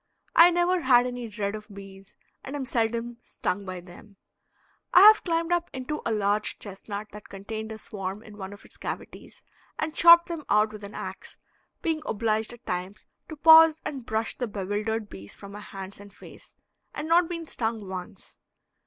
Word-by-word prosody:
I 335 +1 +9
never 350 +1 +1
had 250 -3 +5
any 245 -1 -5
dread 205 -2 -3
of 215 0 -8
bees 195 0 -12 0.3
and 270 - -6
am 280 -2 -3
seldom 235 -1 -1
stung 200 -3 -4
by 185 -1 -6
them. 185 +3 -15 0.8
I 360 - +10
have 430 +2 +8
climbed 335 -1 -1
up 345 -1 +1
into 265 +4 -4
a - - 0
large 210 0 0
chestnut 205 +1 -7
that 210 0 -12
contained 220 +3 -6
a 220 - -6
swarm 195 -1 -6
in 215 -2 -13
one 195 -1 -7
of 205 - -13
its - - -14
cavities - - -8 0.3
and 310 0 -3
chopped 340 +1 +8
them 335 -3 -5
out 215 +1 +3
with 210 -1 -10
an 200 +1 -9
ax, - - -7 0.5
being 320 -2 0
obliged 220 0 0
at 240 0 -14
times 180 +3 -5 0.2
to 315 - -6
pause 320 +1 +7
and 270 -4 -5
brush 220 0 -2
the 245 - -3
bewildered 210 +2 -3
bees 100 - -10
from 200 -1 -11
my 205 - -8
hands 195 -1 -9
and 205 -1 -14
face, - - -14 0.4
and 300 - -4
not 335 +1 +4
been 335 -1 -5
stung 225 -7 -3
once. 185 +1 -9
220 Hz, 185 wpm, -26 LUFS, 200-300 Hz, 0.8 s, I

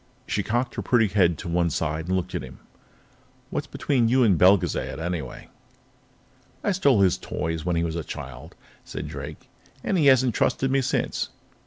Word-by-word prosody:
She 100 - -1
cocked 120 +6 -1
her - - -3
pretty 120 -3 +3
head 90 -4 +3
to - - -7
one 85 0 +1
side 80 +1 -2
and 95 - +1
looked 90 0 -4
at - - -2
him. 65 0 -10 0.9
"What's - - -3
between 125 -5 +1
you 130 +1 +4
and 105 -5 +5
Belgezad, 90 -4 +3
anyway?" 80 -6 -5 1.1
"I 205 - +2
stole 140 - +3
his 95 -2 +3
toys 80 0 -3
when 90 -1 +1
he 85 - +1
was 85 -1 -2
a 85 - -3
child," - - -8 0.3
said - - -6
Drake, - - -8 0.4
"and 190 - +1
he 145 - +4
hasn't 130 -3 +5
trusted 135 +4 +1
me 135 0 +3
since. 125 - -1
95 Hz, 180 wpm, -25 LUFS, 85-125 Hz, 1.1 s, and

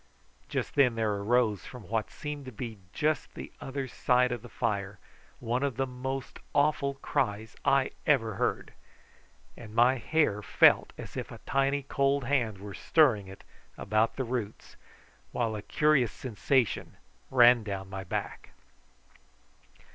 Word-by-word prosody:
Just - - -2
then 125 -5 +4
there 110 -2 0
arose 105 0 +1
from 125 -3 -10
what 110 -1 -2
seemed 150 -2 -6
to 130 - -7
be 110 -1 -7
just 155 +5 -1
the - - -8
other 135 0 -4
side 125 0 +2
of 120 -3 -3
the 120 - -11
fire 100 -1 -2 0.4
one 120 +1 -1
of 140 -3 -1
the 135 - 0
most 130 +1 -5 0.2
awful 145 -1 +2
cries 110 -4 -2
I 135 -1 +3 0.2
ever 115 -7 +3
heard, - - -2 0.8
and 110 -2 -11
my 125 +3 +5
hair 120 -5 +1
felt - - +4
as - - -9
if - - -4
a - - -8
tiny 135 +1 +1
cold 140 0 +1
hand 120 -6 0
were 100 +1 -8
stirring 115 - +3
it 95 +1 -12 0.3
about 110 +2 +1
the 135 - -2
roots, 115 -4 -5 0.6
while 115 -3 -1
a 105 - -5
curious 145 0 +2
sensation 125 0 -1 0.3
ran 120 -2 +6
down 100 -2 -5
my 95 0 -6
back. 90 - -5
120 Hz, 145 wpm, -29 LUFS, 110-135 Hz, 0.8 s, ran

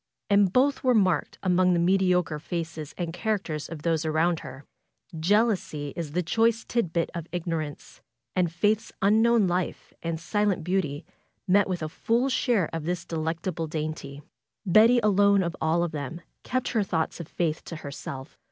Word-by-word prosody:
And 200 -2 +5
both 275 +7 +2
were 255 -2 +4
marked 185 -5 +2
among 180 -1 +3
the 170 - +2
mediocre 180 -3 +2
faces 160 -2 -5
and 170 -2 -3
characters 180 -6 -2
of 155 -2 -8
those 165 -2 +1
around 160 +1 +1
her. 135 0 -10 0.5
Jealousy 180 -6 +1
is 165 -4 -5
the 180 +2 0
choice 225 +5 +1
tit 235 -9 0
bit 170 0 0
of 170 -2 -5
ignorance. 165 -4 -4 0.3
And 180 -3 +2
Faith's 210 +6 0
unknown 220 +2 +4
life 180 0 -2
and 165 -1 -3
silent 205 +1 0
beauty 155 -5 -1 0.4
met 195 +1 +4
with 180 -3 -2
a - - -1
full 235 - 0
share 230 - +1
of 165 -2 -4
this 175 0 -2
delectable 165 +1 -3
dainty. 150 -2 -5 0.4
Betty 220 +6 +6
alone 200 -1 +4
of 170 - -1 0.4
them 145 0 -5
all 170 - -9 0.2
kept 255 0 -2
her 225 - +1
thoughts 175 -5 -1
of 170 - -6
Faith 160 -3 -1
FAITH - - -22
to 165 - -6
herself. 140 -2 -8
175 Hz, 165 wpm, -26 LUFS, 160-205 Hz, 0.5 s, Betty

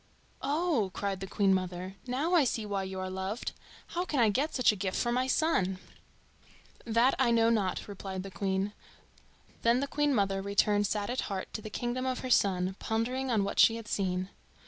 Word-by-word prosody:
"Oh!" 290 - +1
cried 200 -2 -2
the 195 - -5
Queen 195 0 +2
mother, 185 0 -2
"now 280 +8 0
I 335 -4 +6
see 230 -4 -1
why 200 -1 -2
you 190 0 -5
are 185 - -3
loved. 190 +5 -3 0.4
How 350 - -1
can 300 -7 -2
I 225 -2 +5
get 280 +10 0
such 255 -4 +5
a - - -4
mirror 190 -1 -2
for 240 - 0
my 255 +2 +1
son?" 195 - +1 1.1
"That 235 +3 +3
I 260 -3 +4
know 230 0 +4
not," 200 -5 0
replied 190 -2 -6
the 195 - -8
Queen. 195 +1 -1 0.9
Then 235 +2 +4
the 280 - 0
Queen 295 +1 +1
mother 195 -2 +1
returned 205 +1 +2
sad 205 +2 -2
at 255 - -1
heart 190 -2 -4
to 215 - -4
the 215 - -7
kingdom 245 +4 -2
of 255 -1 -2
her 255 - -4
son, 185 -3 +2
pondering 250 +4 -1
on 220 -4 +2
what 200 - -2
she 225 - +7
had 230 -2 -7
seen. 185 -2 -1
210 Hz, 200 wpm, -30 LUFS, 195-255 Hz, 1.1 s, she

